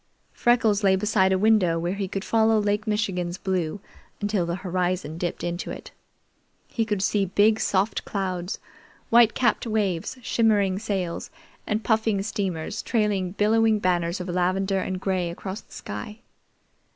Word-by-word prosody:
Freckles 225 -4 +2
lay 190 -1 +5
beside 190 -1 +2
a 190 - +3
window 195 -5 +3
where 170 +2 -1
he 200 -1 -3
could 195 +1 -4
follow 225 0 +3
Lake 205 +1 0
Michigan's 190 -4 -1
blue 185 -2 -2 0.4
until 205 -4 0
the 170 - -1
horizon 180 -3 -1
dipped 175 -1 -3
into 175 0 -3
it. - - -8 0.8
He 225 - -1
could 210 -3 -1
see 200 0 +2
big 210 +4 +3
soft 195 +2 0
clouds, 185 -2 -3 0.5
white 230 -1 +6
capped 240 -1 +1
waves, 210 0 -1
shimmering 205 -5 +2
sails, 190 -5 -3 0.4
and 215 +1 -1
puffing 220 -3 +1
steamers 195 -2 -3
trailing 205 -5 0
billowing 220 +1 +3
banners 175 -2 0
of 180 - -5
lavender 185 +2 0
and 185 0 -3
gray 185 -2 -1
across 190 +4 -6
the - - -30
sky. 210 - -7
195 Hz, 150 wpm, -25 LUFS, 180-215 Hz, 0.8 s, white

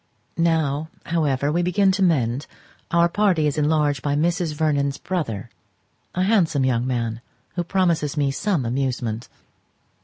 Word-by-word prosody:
Now, 160 -2 +1 0.2
however, 145 -4 0
we 170 +3 +1
begin 190 +2 +3
to 190 +1 -1
mend, 135 -7 +1 0.4
our 170 0 +4
party 185 -4 +2
is 145 - +1
enlarged 150 -2 +2
by 145 -1 0
Mrs. 165 0 0
Vernon's 145 -3 0
brother, 115 - -3 0.6
a 185 - +1
handsome 175 -10 +2
young 125 -1 +1
man, 115 -2 -2 0.3
who 175 - -1
promises 170 -5 0
me 140 -2 +2
some 160 - -1
amusement. 120 -2 -2
150 Hz, 135 wpm, -23 LUFS, 135-170 Hz, 0.6 s, our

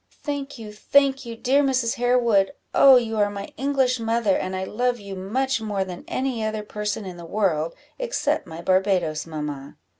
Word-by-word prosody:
"Thank 285 -2 -4
you, 215 -2 -9
thank 270 +4 +2
you, 230 - -5
dear 270 +5 +3
Mrs. 260 -4 +1
Harewood! 240 -3 +3 0.2
oh, 270 -1 +8
you 225 -3 +1
are 205 0 +3
my 200 0 -7
English 265 -2 +1
mother, 225 -3 +1
and 185 0 -2
I 185 - -2
love 245 +5 -1
you 200 -1 -8
much 230 +7 -1
more 205 -3 -1
than 180 -2 -8
any 255 -4 -2
other 215 -1 -2
person 210 0 -4
in 180 -2 -7
the 170 - -9
world, 165 -4 0 0.2
except - - -1
my 165 0 -8
Barbadoes 185 -4 +1
mamma." 150 -3 -6
215 Hz, 180 wpm, -24 LUFS, 190-255 Hz, 0.2 s, oh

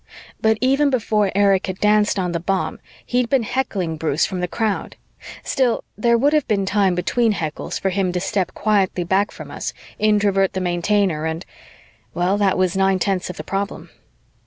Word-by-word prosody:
But 220 0 +3
even 275 +3 +3
before 215 -6 +1
Erich 195 -2 +3
had 185 -1 -4
danced 210 0 +3
on 180 -2 -1
the 170 - -1
bomb, 190 +3 -2 0.3
he'd 245 -1 0
been 270 -4 +2
heckling 200 -10 -2
Bruce 155 -1 +1
from 185 - -4
the 180 - -1
crowd. 215 +2 -2 0.5
Still, 255 -3 0
there 235 +3 +3
would 285 +5 +2
have 305 -3 +2
been 200 -3 +1
time 195 -2 +2
between 220 +6 +1
heckles 155 -6 -4
for 190 - 0
him 190 -1 0
to 180 - 0
step 190 0 -2
quietly 195 -4 +1
back 190 +4 +1
from - - -10
us, - - -4 0.3
Introvert 205 -2 +2
the 190 - -2
Maintainer 175 -2 0
and... 160 +3 -4 0.7
well, 180 +3 +1
that 195 -2 +2
was 185 -1 +1
nine 195 0 +3
tenths 185 -1 -1
of 180 - -7
the 155 - -6
problem. 195 +4 -4
195 Hz, 185 wpm, -21 LUFS, 180-215 Hz, 0.7 s, But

